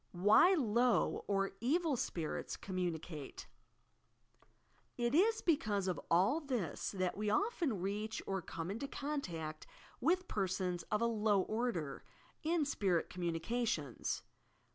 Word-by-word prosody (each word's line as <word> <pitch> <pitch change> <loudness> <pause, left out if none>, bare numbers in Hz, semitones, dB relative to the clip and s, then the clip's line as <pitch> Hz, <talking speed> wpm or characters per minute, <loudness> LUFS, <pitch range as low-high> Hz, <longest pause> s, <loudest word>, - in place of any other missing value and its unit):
WHY 210 - +6
LOW 240 - +2
oa 195 -1 +2
"evil" 300 - +2
sprarrs 165 -9 -3
commxjnicatb 175 -5 -4 1.5
It 240 0 0
is 440 +8 +4
because 210 - +1
of 180 -5 -1
all 190 - +4
this 245 - -2
that 185 -2 -1
we 210 +1 -1
often 340 - +1
reach 210 +3 -2
or 195 -1 -1
come 165 +1 -5
into 230 +7 -4
contact 175 - -4 0.3
with 360 +7 +2
persons 185 -3 -1
of 210 +1 +1
a - - +3
low 215 -3 +3
order, 210 - -2 0.4
in 320 -1 +1
spirit 190 - 0
com 180 -1 -4
munications. 165 - -1
210 Hz, 120 wpm, -36 LUFS, 180-265 Hz, 1.5 s, WHY